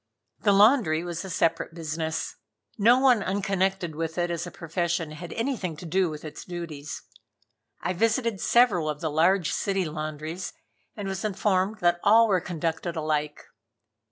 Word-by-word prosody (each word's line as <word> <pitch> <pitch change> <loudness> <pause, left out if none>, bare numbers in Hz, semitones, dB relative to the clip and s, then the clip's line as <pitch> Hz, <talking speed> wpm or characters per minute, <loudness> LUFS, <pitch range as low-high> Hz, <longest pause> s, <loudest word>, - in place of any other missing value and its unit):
The 205 - +3
laundry 200 - +5
was 175 0 -4
a 190 - -7
separate 165 -1 0
business. 160 -1 -3 0.4
No 230 +4 +5
one 255 -4 +4
unconnected 195 -3 -1
with 160 +1 -3
it 175 0 0
as 170 0 -3
a - - -5
profession 170 -1 -2
had 165 +2 -8
anything 225 - -2
to 175 - -9
do 180 +2 +1
with 155 0 -8
its 155 - -8
duties. 165 -5 -7 0.8
I 180 - -1
visited 225 +1 +1
several 205 -10 +4
of 150 -1 -3
the 160 -1 -2
large 170 +3 +3
city 195 -2 0
laundries 155 +2 -5 0.4
and 205 -2 -4
was 190 0 -3
informed 200 0 0
that 175 0 +3
all 225 +2 +6
were 190 -4 +2
conducted 170 0 -3
alike. 150 -2 -2
175 Hz, 155 wpm, -26 LUFS, 160-195 Hz, 0.8 s, all